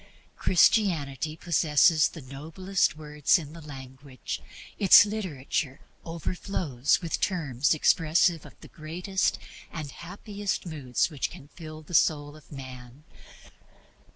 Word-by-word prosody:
Christianity 160 - +2
possesses 160 -2 +4
the 160 - -11
noblest 155 +5 -1
words 150 +1 +2
in 155 -3 -8
the 165 - -10
language; 135 -2 -8 0.4
its 200 +1 +9
literature 155 -9 -3 0.2
overflows 165 -5 -1
with 165 - -2
terms 150 -7 +1
expressive 165 +1 +3
of - - -15
the - - -11
greatest 175 +5 -2 0.3
and 155 -4 -6
happiest 200 +4 -5
moods 145 -3 -1
which 145 -4 -2
can 140 - -13
fill 155 -2 -10
the 165 - -12
soul 145 -2 +2
of 155 - -18
man. 130 -1 -10
155 Hz, 115 wpm, -27 LUFS, 140-175 Hz, 0.4 s, its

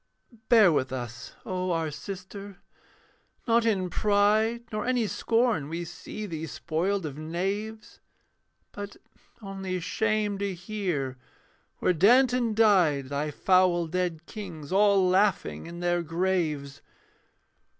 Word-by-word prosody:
Bear 220 -7 +7
with 130 -4 0
us, 120 -3 -6
O 185 0 -2
our 165 -3 0
sister, 195 +5 -8 0.9
not 230 0 +3
in 190 -4 +1
pride, 215 +4 +2
Nor 215 -1 -2
any 250 -3 +2
scorn 225 - +1
we 170 +2 -4
see 190 +5 -7
thee 160 -4 -5
spoiled 180 +5 -2
of 145 -1 -6
knaves, 195 +7 -4 0.7
But 205 0 -8 0.5
only 195 -2 -4
shame 210 +2 0
to 200 -2 -2
hear, 175 - -3 0.6
where 180 - +2
Danton 240 +5 +4
died, 175 -11 +4
Thy 145 +2 -2
foul 180 +2 +3
dead 170 -1 -2
kings 170 -9 -8
all 200 -1 +4
laughing 190 -2 +1
in 170 +1 -8
their 175 0 +1
graves. 165 -4 -1
185 Hz, 120 wpm, -27 LUFS, 165-210 Hz, 0.9 s, Bear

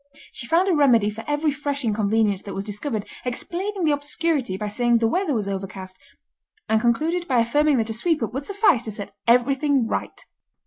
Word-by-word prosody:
She 235 - -7
found 340 +7 +3
a 380 - +3
remedy 240 -9 +4
for 225 +2 -8
every 295 +1 +1
fresh 285 -1 -3
inconvenience 210 -2 +1
that 200 - -8
was 195 - -3
discovered, 210 +1 -4 0.2
explaining 360 +10 -3
the 310 - +3
obscurity 290 - -1
by 210 - -3
saying 240 +3 +2
the 225 0 +2
weather 320 - 0
was 210 -3 -1
overcast, 190 -1 -5 0.7
and 220 0 +2
concluded 320 +10 0
by 255 - +1
affirming 290 +4 +2
that 225 -1 0
a - - -2
sweep 310 +5 0
up 225 - -3
would 270 +2 -4
suffice 400 - +3
to 220 - -3
set 200 -1 -6
everything 265 +2 +3
right. - - -4
245 Hz, 190 wpm, -23 LUFS, 215-300 Hz, 0.7 s, remedy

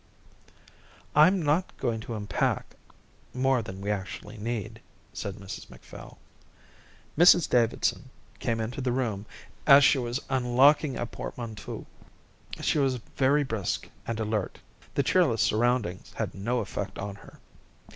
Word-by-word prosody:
"I'm 170 +5 +6
not 155 +5 0
going 115 -4 -1
to 115 +1 -6
unpack 105 -1 -1 0.6
more 130 -1 +2
than 95 -3 -8
we 100 +1 -1
actually 105 +1 -5
need," 110 -1 -4 0.3
said 100 -2 -5
Mrs 95 -2 -9
Macphail. - - -12 1.0
Mrs 175 0 +7
Davidson 120 -2 +1 0.3
came 115 -1 -1
into 115 +4 -3
the 125 -1 0
room 110 -5 -2 0.4
as 140 -1 +9
she 140 -1 +5
was 120 +1 -2
unlocking 135 +3 +3
a 120 - -2
portmanteau. 115 -2 -7 0.8
She - - +1
was 135 -2 +2
very 135 +4 +1
brisk 110 -8 -3 0.2
and 115 -1 -2
alert. 105 -3 -2 0.4
The 140 - +2
cheerless 140 -7 +3
surroundings 110 -5 0
had - - -3
no 120 +6 -1
effect 95 -1 -5
on 100 0 -4
her. - - -16
120 Hz, 130 wpm, -28 LUFS, 105-135 Hz, 1.0 s, as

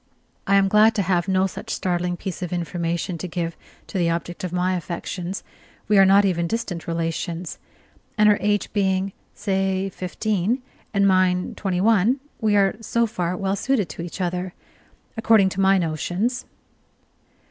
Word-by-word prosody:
I 200 - +4
am 195 0 +5
glad 215 +3 +5
to 200 - +1
have 180 -1 +1
no 190 0 +2
such 190 - -6
startling 175 -1 -1
piece 190 0 -6
of 180 - -4
information 170 0 -2
to 185 - -4
give 170 -1 -3 0.3
to 190 - -4
the 170 -1 +2
object 170 +1 -3
of 180 - -3
my 180 +1 +1
affections: 180 +2 -5 0.4
we 210 -1 +5
are 195 - +7
not 200 +1 +6
even 170 -3 +1
distant 220 -5 -3
relations, 165 +1 -3 0.6
and 210 0 +5
her 210 -1 +5
age 205 0 0
being, 190 -1 +1 0.2
say, 195 -1 0
fifteen, 210 +5 -1 0.3
and 200 -1 +3
mine 185 -1 +2
twenty 185 -3 -2
one, 225 +4 +3 0.2
we 215 -2 +2
are 195 0 +3
so 235 +1 +1
far 180 -5 -2
well 195 +1 0
suited 210 - 0
to 155 - -7
each 170 +3 -7
other, 180 0 -2 0.6
according 220 -4 +4
to 190 +1 -2
my 195 0 +5
notions. 180 +8 -1
190 Hz, 165 wpm, -23 LUFS, 175-200 Hz, 0.6 s, are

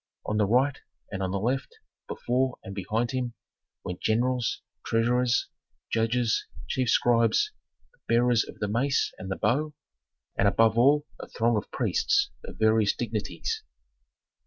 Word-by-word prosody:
On 105 - -1
the 105 -2 +3
right, 130 +5 +2 0.3
and 95 -1 -4
on 95 - -1
the 100 - -1
left, 125 +6 -2 0.3
before 125 +1 -1
and 95 - -7
behind 110 +5 -1
him, 125 -2 -3 0.5
went 90 - -6
generals, 120 +1 0 0.2
treasurers, 120 +2 +2 0.4
judges, 115 0 +1 0.2
chief 130 -2 0
scribes, 120 - +3 0.4
the - - -31
bearers 120 -1 +3
of - - -11
the 105 - -2
mace 135 +6 +1
and 95 - -6
the 95 - -1
bow, 145 +8 0 0.6
and 100 - +3
above 110 +2 +4
all 145 +5 +4
a - - -7
throng 115 0 +1
of 105 - -2
priests - - +1
of - - -9
various 110 -1 +3
dignities. 105 -7 -3
115 Hz, 145 wpm, -27 LUFS, 110-125 Hz, 0.6 s, above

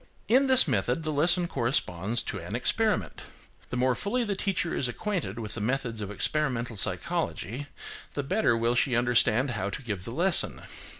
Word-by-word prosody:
In 265 +4 +4
this 260 -6 +7
method 125 +5 0
the 155 - -2
lesson 170 +4 +3
corresponds 115 - -1
to 100 - -4
an 90 +6 -5
experiment. 125 - 0 0.5
The 120 - -3
more 130 +1 +3
fully 230 - -1
the 205 -3 -2
teacher 190 -3 -1
is 130 - 0
acquainted 140 - -3
with 110 -2 -3
the 110 - -2
methods 115 -1 -2
of 100 - -4
experimental 120 0 -1
psychology, 120 +6 -2 0.5
the 145 - -1
better 140 - +2
will 115 +1 +1
she 125 0 +2
understand 120 +1 +3
how 105 -3 -2
to 115 - -6
give 100 -7 -4
the 115 - -6
lesson. 170 +6 +1
125 Hz, 175 wpm, -28 LUFS, 115-165 Hz, 0.5 s, this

